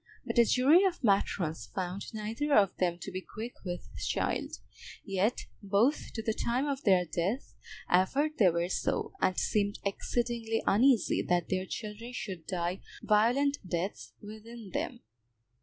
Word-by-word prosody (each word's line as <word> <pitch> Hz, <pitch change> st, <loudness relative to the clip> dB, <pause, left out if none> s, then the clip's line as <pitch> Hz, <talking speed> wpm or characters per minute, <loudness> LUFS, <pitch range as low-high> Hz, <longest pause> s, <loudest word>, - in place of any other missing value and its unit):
But -, -, +1 dB
a 235 Hz, -, +7 dB
jury 280 Hz, -, +5 dB
of 365 Hz, -6 st, 0 dB
matrons 175 Hz, -, +1 dB
found 185 Hz, +1 st, -4 dB
neither 225 Hz, +7 st, -1 dB
of 195 Hz, -3 st, +4 dB
them 175 Hz, -2 st, +1 dB
to 195 Hz, -, -6 dB
be 185 Hz, +1 st, -4 dB
quick 225 Hz, +5 st, -7 dB
with 180 Hz, -2 st, -5 dB, 0.2 s
child; -, -, -1 dB, 0.5 s
yet 195 Hz, +3 st, 0 dB, 0.2 s
both 210 Hz, +8 st, +1 dB
to 225 Hz, -, -4 dB
the 220 Hz, -, 0 dB
time 245 Hz, +5 st, 0 dB
of 280 Hz, -2 st, -2 dB
their 185 Hz, -6 st, +4 dB
death 185 Hz, -, -2 dB, 0.3 s
averred 275 Hz, +13 st, +2 dB
they 195 Hz, -5 st, +7 dB
were 170 Hz, +1 st, 0 dB
so, 185 Hz, -, -1 dB
and 185 Hz, -, +2 dB
seemed 205 Hz, -1 st, +1 dB
exceedingly 230 Hz, +2 st, -1 dB
uneasy 235 Hz, 0 st, +4 dB
that 175 Hz, -1 st, +1 dB
their 185 Hz, 0 st, -1 dB
children 220 Hz, +4 st, -6 dB
should 185 Hz, -9 st, -6 dB
die 180 Hz, 0 st, -2 dB, 0.2 s
violent 250 Hz, +7 st, +3 dB
deaths 180 Hz, +1 st, -4 dB
within 220 Hz, 0 st, -10 dB
them. -, -, -3 dB
210 Hz, 150 wpm, -30 LUFS, 185-240 Hz, 0.5 s, a